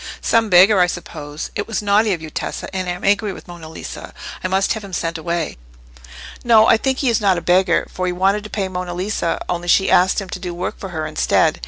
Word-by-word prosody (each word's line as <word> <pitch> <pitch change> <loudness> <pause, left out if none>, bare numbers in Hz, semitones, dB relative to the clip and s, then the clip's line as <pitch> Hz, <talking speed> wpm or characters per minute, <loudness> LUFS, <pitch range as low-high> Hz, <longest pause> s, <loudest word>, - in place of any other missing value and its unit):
"Some 230 -1 +2
beggar, 190 +3 +6
I 180 - +5
suppose. 150 -4 -6
It 205 - -3
was 220 -2 -3
naughty 205 +1 +3
of 170 -4 -2
you, 155 - -8
Tessa, - - -5
and 185 -1 -2
I - - 0
am 180 - -9
angry 205 +1 +2
with - - -12
Monna 170 -2 -10
Lisa. 160 - -9 0.3
I - - 0
must 190 +1 +1
have 220 -2 -6
him 195 -2 -10
sent 165 -1 -2
away." 170 - -3 0.8
"No, 225 -2 +6
I - - +6
think 265 +3 -1
he 270 - +1
is 230 - +1
not 195 -3 +3
a - - 0
beggar, 175 0 +2
for 185 0 -4
he - - 0
wanted 195 +3 +1
to - - -7
pay 200 -3 -2
Monna 180 -1 -5
Lisa, 185 -2 -2
only 175 0 -3
she 190 +2 +3
asked 185 +3 +4
him 195 - -6
to - - -5
do 175 -2 -5
work 180 +2 -4
for 195 - -6
her 160 -3 -4
instead. 155 - +1
185 Hz, 245 wpm, -19 LUFS, 175-205 Hz, 0.8 s, beggar